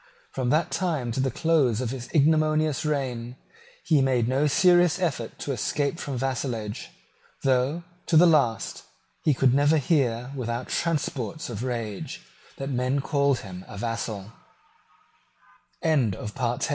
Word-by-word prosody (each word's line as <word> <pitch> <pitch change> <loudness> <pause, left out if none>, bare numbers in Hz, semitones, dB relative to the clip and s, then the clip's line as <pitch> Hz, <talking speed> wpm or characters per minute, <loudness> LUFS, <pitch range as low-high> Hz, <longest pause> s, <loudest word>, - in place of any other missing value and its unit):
From 130 -2 -2
that 155 +5 +2
time 155 -10 -1
to 115 - -3
the 135 0 +2
close 140 -5 +2
of 125 -2 -2
his 125 -2 -6
ignominious 155 0 +2
reign, 125 -5 -2 0.5
he 155 -4 +3
made 125 -3 +2
no 135 +4 +2
serious 175 +2 +4
effort 155 -11 -2
to 145 - -4
escape 140 +6 -1
from 140 -3 -4
vassalage, 120 -5 -3 0.5
though, 135 +5 +1 0.2
to 165 - +4
the 175 - +8
last, 140 - +2 0.4
he 150 - +2
could 130 -1 +3
never 145 +3 +4
hear, 130 -5 +1
without 120 -1 -3
transports 155 -4 -2
of 110 -2 -5
rage, 115 -5 -4 0.3
that 135 +1 -4
men 130 +2 0
called 140 -1 +1
him 90 -2 -9
a 100 - -8
135 Hz, 130 wpm, -26 LUFS, 120-155 Hz, 0.5 s, the